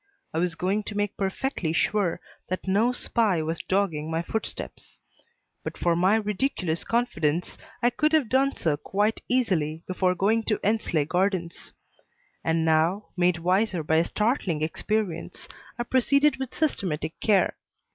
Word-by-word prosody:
I 160 - 0
was 175 -1 0
going 190 +5 0
to 205 - -5
make 205 -1 -1
perfectly 190 - -2
sure 195 0 +1 0.3
that 185 +1 -4
no 210 +6 +3
spy 215 -8 +1
was 160 +1 -2
dogging 175 -6 0
my 165 +1 -1
footsteps. 220 +6 -6 0.6
But - - -5
for 170 -1 +2
my 185 +5 +4
ridiculous 210 -6 -1
confidence 180 -9 0 0.3
I 240 - +4
could 305 +5 +1
have 305 -6 +4
done 270 +3 +2
so 155 -4 0
quite 205 +7 0
easily 170 -11 0
before 185 0 +1
going 215 +5 +2
to 210 - +1
Endsley 200 -8 +1
Gardens; 180 0 -1 0.7
and 165 0 +1
now, 165 +6 +2
made 180 -1 +2
wiser 180 +1 +1
by 160 +1 +2
a 165 - +3
startling 205 - 0
experience, 180 +1 -2 0.3
I 240 - -1
proceeded 280 +3 +3
with 265 -2 -5
systematic 170 - -1
care. 205 -3 +3
190 Hz, 145 wpm, -26 LUFS, 165-220 Hz, 0.7 s, my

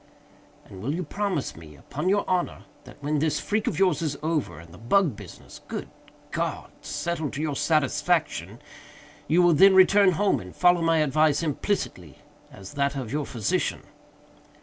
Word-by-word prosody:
"And 95 - -11
will 140 +8 -2
you 180 - -3
promise 190 -3 -3
me, 80 -2 -13
upon 180 - -4
your 205 +1 +1
honor, 180 -1 -1 0.2
that - - -13
when 150 +1 0
this 155 0 0
freak 210 +1 -2
of - - -1
yours 180 -5 +2
is 155 -3 -2
over, 160 -2 -1
and 85 0 -14
the 90 - -13
bug 145 - +2
business - - -12
(good - - -6 0.4
God!) - - -3
settled 165 -4 -3
to 145 - -4
your 150 -3 -2
satisfaction, 150 - 0 0.7
you 175 +3 +4
will 175 -1 +5
then 190 +5 +6
return 190 0 +6
home 200 +4 +1
and 90 0 -11
follow 175 -1 +4
my 165 0 +2
advice 155 +2 +2
implicitly, 140 - -3 0.3
as 95 0 -11
that 140 0 0
of 130 -5 -5
your 145 0 -2
physician?" 110 -6 -1
155 Hz, 170 wpm, -25 LUFS, 135-180 Hz, 0.7 s, then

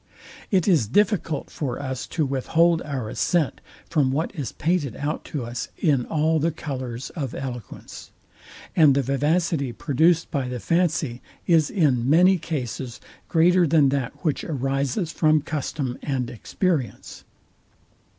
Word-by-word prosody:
It 190 -3 +2
is 160 - +4
difficult 185 - +1
for 135 -5 -3
us 130 -2 -4
to 155 - -1
withhold 160 +5 +2
our 135 -6 -4
assent 155 +6 0 0.3
from 140 -5 +2
what 155 +5 -1
is 145 -9 -4
painted 155 -7 -1
out 145 +2 -3
to 140 -6 -4
us 120 0 -4
in 140 -7 +1
all 160 +1 +1
the 160 +3 +2
colours 130 -6 -5
of 135 -7 -4
eloquence; 125 -5 -7 0.7
and 150 -5 +6
the 140 - +2
vivacity 145 +1 0
produced 160 +7 +2
by 140 -5 -1
the 125 -1 -4
fancy 160 -6 0 0.2
is 160 -4 +4
in 135 - +2
many 180 +4 +5
cases 130 -5 -4 0.3
greater 175 +1 +4
than 145 -2 +4
that 140 +2 -3
which 150 - 0
arises 135 - -1
from 155 -2 +3
custom 140 -4 -3
and 130 -4 -2
experience. 145 - -3
145 Hz, 140 wpm, -24 LUFS, 130-165 Hz, 0.7 s, and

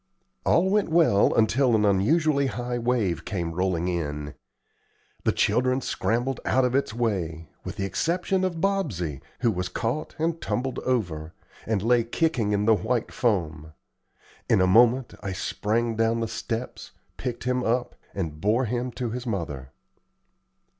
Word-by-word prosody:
All 175 +3 +4
went 205 -2 +2
well 160 -12 +4
until 120 +2 +3
an 105 -1 +3
unusually 140 - +3
high 120 +1 -3
wave 110 -9 0
came 85 -4 -3
rolling 90 -1 0
in. 75 -4 -3 0.9
The - - +4
children 130 +5 +2
scrambled 120 0 -1
out 130 0 +2
of 125 - 0
its 140 -2 +1
way, 90 -9 -2
with - - -6
the 100 - -2
exception 180 - 0
of 175 -3 -1
Bobsey, 130 - -1 0.2
who 120 -3 +3
was 90 -2 -3
caught 120 +11 -3
and 165 +1 -1
tumbled 130 +1 -2
over, 85 -11 -2 0.3
and 105 -3 0
lay 120 +1 +4
kicking 120 -3 0
in 105 0 +1
the 110 - +6
white 115 +2 -1
foam. 80 - -1 0.8
In - - +4
a 95 - +4
moment 120 +6 +4
I 95 - -3
sprang 115 +4 -1
down 115 +1 +2
the 115 - -1
steps, 115 +2 -5 0.2
picked 125 -2 -4
him 125 0 0
up, 120 +2 0 0.2
and 80 -5 -4
bore 115 +6 +2
him 120 +2 -2
to 120 -3 -3
his 125 +1 -5
mother. 75 - -4
115 Hz, 155 wpm, -26 LUFS, 95-125 Hz, 0.9 s, the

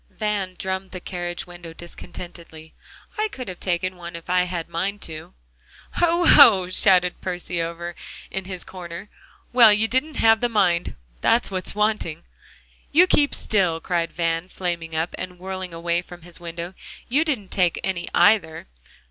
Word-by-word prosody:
Van 205 -4 -2
drummed 190 0 -3
on - - -24
the 185 - -7
carriage 175 -1 -5
window 175 -2 -11
discontentedly. 170 -1 -11 0.5
"I 430 - +2
could 255 -2 -7
have 185 -2 -7
taken 185 0 -1
one 170 0 -8
if 170 +1 -7
I'd 180 0 +3
had 175 -2 -4
the - - -29
mind 195 +5 -2
to." 155 - -8 0.6
"Hoh 345 0 +2 0.2
oh!" 195 -10 +8
shouted 185 -1 +3
Percy 180 -1 -3
over 170 +1 -5 0.4
in 190 -1 -4
his 185 -2 -7
corner. 175 +2 -9 0.4
"Well, 235 -3 +8
you 210 +2 +3
didn't 260 +6 -1
have 225 0 +5
the 245 - +1
mind; 180 -6 +1 0.3
that's 230 -3 +2
what 185 -1 -3
was - - +1
wanting." 210 -6 -1 0.7
"You 340 +5 +6
keep 290 -5 +3
still," 180 -6 +1
cried 170 -1 -1
Van, 165 +1 -1
flaming 170 -3 -4
up, 160 +2 -1
and 180 -1 -6
whirling 185 0 -6
away 170 +1 -1
from 175 -1 -13
his 175 0 -11
window. 170 +1 -6 0.3
"You 285 +6 +2
didn't 255 - -2
take 180 -3 +2
any, 190 -3 -2
either. 175 -7 +3
180 Hz, 170 wpm, -23 LUFS, 170-205 Hz, 0.7 s, oh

